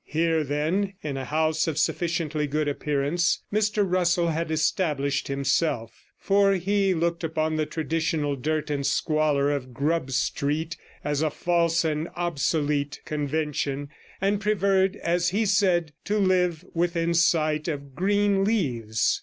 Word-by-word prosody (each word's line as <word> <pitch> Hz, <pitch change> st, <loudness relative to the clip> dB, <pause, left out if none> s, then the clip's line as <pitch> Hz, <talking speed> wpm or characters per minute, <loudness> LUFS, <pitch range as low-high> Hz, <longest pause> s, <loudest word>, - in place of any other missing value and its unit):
Here, 160 Hz, 0 st, +1 dB
then, 160 Hz, +8 st, -1 dB
in 145 Hz, -3 st, -3 dB
a 135 Hz, -1 st, -4 dB
house 155 Hz, +2 st, +1 dB
of 155 Hz, -3 st, -2 dB
sufficiently 160 Hz, -2 st, 0 dB
good 150 Hz, +1 st, -1 dB
appearance, 145 Hz, +4 st, 0 dB
Mr 210 Hz, 0 st, +2 dB
Russell 175 Hz, -1 st, +2 dB
had 165 Hz, 0 st, -2 dB
established 150 Hz, -3 st, 0 dB
himself; 140 Hz, -3 st, 0 dB, 0.3 s
for 195 Hz, 0 st, +3 dB
he 195 Hz, +1 st, +1 dB
looked 170 Hz, +1 st, -1 dB
upon 160 Hz, -1 st, -1 dB
the 155 Hz, -1 st, 0 dB
traditional 160 Hz, -2 st, -1 dB
dirt 155 Hz, +3 st, -2 dB
and 140 Hz, -1 st, -1 dB
squalor 150 Hz, -1 st, +1 dB
of 130 Hz, -4 st, -4 dB
Grub 150 Hz, +1 st, 0 dB
Street 145 Hz, +5 st, -1 dB, 0.3 s
as 145 Hz, 0 st, -1 dB
a 160 Hz, -, +2 dB
false 170 Hz, +1 st, +1 dB
and 155 Hz, +1 st, -1 dB
obsolete 145 Hz, -4 st, -1 dB
convention, 145 Hz, -1 st, -2 dB, 0.3 s
and 200 Hz, +1 st, +1 dB
preferred, 195 Hz, -2 st, +2 dB
as 175 Hz, +1 st, 0 dB
he 215 Hz, +4 st, 0 dB
said, 185 Hz, -5 st, +2 dB
to 210 Hz, -, 0 dB
live 180 Hz, -4 st, +1 dB
within 170 Hz, 0 st, 0 dB
sight 155 Hz, -2 st, +2 dB
of 140 Hz, -4 st, -5 dB
green 200 Hz, +4 st, +2 dB
leaves. 120 Hz, -, 0 dB
160 Hz, 135 wpm, -25 LUFS, 145-175 Hz, 0.3 s, for